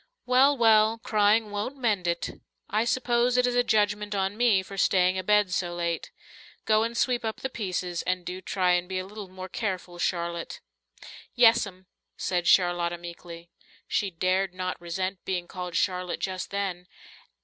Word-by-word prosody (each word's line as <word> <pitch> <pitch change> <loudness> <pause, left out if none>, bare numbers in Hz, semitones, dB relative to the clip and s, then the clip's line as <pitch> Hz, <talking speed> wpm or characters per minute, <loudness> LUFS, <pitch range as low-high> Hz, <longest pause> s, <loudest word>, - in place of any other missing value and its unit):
"Well, 265 +3 +4
well, 220 -1 +5
crying 215 -1 +2
won't 210 +7 -4
mend 210 -8 0
it. 170 0 -3 0.3
I 215 +3 +2
suppose 245 0 +1
it 250 - +4
is 245 - +1
a 245 0 +3
judgment 210 -2 +1
on 195 +1 -1
me 220 -5 +3
for 195 - -10
staying 185 -1 +2
abed 210 0 +2
so 175 -1 -1
late. 170 -1 -2 0.6
Go 215 0 +4
and 230 +1 -2
sweep 245 -2 +1
up 220 -1 -4
the 265 - -3
pieces, 180 -6 -3
and 180 0 -2
do 180 +1 -5
try 185 -2 +1
and 180 0 +1
be 190 - -2
a 185 - -3
little 205 0 -9
more 185 0 -8
careful, 185 -4 -4
Charlotte." 170 -1 -2 0.8
"Yes'm," 225 -6 +3 0.3
said 175 -2 -1
Charlotta 175 -1 +3
meekly. 170 0 -10 0.4
She 200 - 0
dared 185 +2 0
not 185 -1 -4
resent 185 +2 -3
being 180 -2 -3
called 180 -2 -6
Charlotte 180 -1 -1
just 185 -1 -3
then. 190 -3 -3
190 Hz, 165 wpm, -27 LUFS, 180-220 Hz, 0.8 s, well